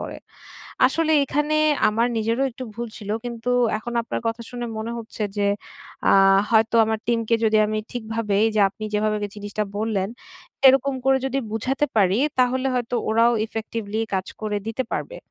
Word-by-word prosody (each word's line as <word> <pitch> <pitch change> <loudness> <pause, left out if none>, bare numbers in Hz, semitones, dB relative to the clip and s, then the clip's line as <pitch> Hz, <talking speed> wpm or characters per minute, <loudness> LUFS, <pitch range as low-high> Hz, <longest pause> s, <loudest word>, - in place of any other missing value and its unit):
করে। - - -6 0.7
আসলে 320 -1 +1
এখানে 295 +3 0 0.3
আমার 230 +3 +1
নিজেরও 230 +4 0
একটু 255 +1 -8
ভুল 235 0 -5
ছিল। 205 -2 -7
কিন্তু 240 0 -4 0.3
এখন 240 +2 -7
আপনার - - -4
কথা 230 +1 -2
শুনে 240 -1 -5
মনে 230 +2 -4
হচ্ছে 225 -1 -7
যে 200 0 +1 0.6
আ - - +6 0.4
হয়তো 225 0 +3
আমার 220 0 -1
টিমকে 230 -1 +1
যদি 215 0 +3
আমি 215 0 -2
ঠিকভাবে 225 -3 -2 0.2
যে 210 - +3
আপনি 215 +3 -9
যেভাবে 215 0 +1 0.2
জিনিসটা 205 +1 -3
বললেন। 205 -3 -1 0.6
এরকম 270 +1 +3
করে 270 0 +4
যদি 270 +1 -1
বুঝাতে 265 +6 0
পারি 195 +1 +3 0.2
তাহলে 255 +1 +2
হয়তো 245 0 -2
ওরাও 230 +2 +4
ইফেক্টিভলি 220 -1 -4
কাজ 190 0 -1
করে 210 -1 -1
দিতে 225 +4 -2
পারবে। - - -3
225 Hz, 160 wpm, -23 LUFS, 215-245 Hz, 0.7 s, আ